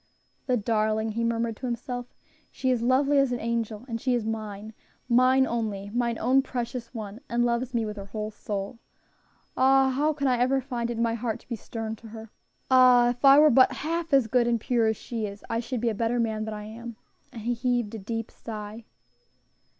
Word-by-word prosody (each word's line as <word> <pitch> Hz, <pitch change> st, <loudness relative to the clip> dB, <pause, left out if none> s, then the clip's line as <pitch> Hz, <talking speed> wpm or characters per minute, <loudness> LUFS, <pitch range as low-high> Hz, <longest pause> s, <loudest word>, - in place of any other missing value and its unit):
"The 250 Hz, -2 st, +2 dB
darling!" 220 Hz, 0 st, 0 dB
he 230 Hz, +2 st, -2 dB
murmured 230 Hz, -1 st, -1 dB
to 260 Hz, -, -5 dB
himself; 245 Hz, +1 st, -4 dB, 0.4 s
"she 260 Hz, -, -1 dB
is 245 Hz, -2 st, +1 dB
lovely 275 Hz, +4 st, +3 dB
as 275 Hz, -2 st, +2 dB
an 245 Hz, -, -1 dB
angel, 230 Hz, -1 st, -3 dB
and 230 Hz, -2 st, -4 dB
she 255 Hz, -2 st, +1 dB
is 235 Hz, -3 st, -2 dB
mine, 215 Hz, -1 st, -5 dB, 0.3 s
mine 255 Hz, +2 st, +4 dB
only, 210 Hz, -5 st, -3 dB
mine 235 Hz, -1 st, 0 dB
own 260 Hz, +3 st, +3 dB
precious 240 Hz, -2 st, -5 dB
one; 220 Hz, -1 st, -7 dB
and 240 Hz, 0 st, +1 dB
loves 240 Hz, +1 st, -1 dB
me 230 Hz, -1 st, +1 dB
with 210 Hz, 0 st, -6 dB
her 200 Hz, 0 st, -7 dB
whole 215 Hz, +1 st, -4 dB
soul. 205 Hz, +2 st, -5 dB, 0.8 s
Ah! 265 Hz, 0 st, +4 dB
how 295 Hz, +4 st, +1 dB
can 285 Hz, -2 st, -3 dB
I 255 Hz, -2 st, +3 dB
ever 260 Hz, +2 st, +2 dB
find 245 Hz, -3 st, -3 dB
it 240 Hz, -, -3 dB
in 230 Hz, -, +1 dB
my 230 Hz, -1 st, +1 dB
heart 230 Hz, -1 st, -3 dB
to -, -, -25 dB
be 240 Hz, -, -3 dB
stern 225 Hz, 0 st, -5 dB
to 230 Hz, -, -13 dB
her? 220 Hz, 0 st, -10 dB, 0.4 s
Ah! 250 Hz, -2 st, +6 dB
if 245 Hz, +2 st, -9 dB
I 275 Hz, 0 st, +8 dB
were 300 Hz, +1 st, +7 dB
but 255 Hz, +1 st, +5 dB
half 330 Hz, +1 st, -3 dB
as 270 Hz, -3 st, +5 dB
good 240 Hz, +2 st, +2 dB
and 235 Hz, -1 st, +1 dB
pure 230 Hz, 0 st, +1 dB
as 220 Hz, -1 st, 0 dB
she 225 Hz, -3 st, -4 dB
is, 200 Hz, 0 st, -10 dB
I 230 Hz, -, 0 dB
should 240 Hz, 0 st, -4 dB
be 240 Hz, -, +1 dB
a -, -, -1 dB
better 230 Hz, +3 st, 0 dB
man 220 Hz, -2 st, -1 dB
than 220 Hz, -, -4 dB
I 210 Hz, -, -7 dB
am." 230 Hz, +2 st, -8 dB, 0.4 s
And 230 Hz, -, -8 dB
he 240 Hz, +2 st, 0 dB
heaved 240 Hz, -2 st, -1 dB
a 220 Hz, -, -5 dB
deep 225 Hz, +3 st, -4 dB
sigh. 215 Hz, 0 st, -8 dB
235 Hz, 220 wpm, -26 LUFS, 220-250 Hz, 0.8 s, I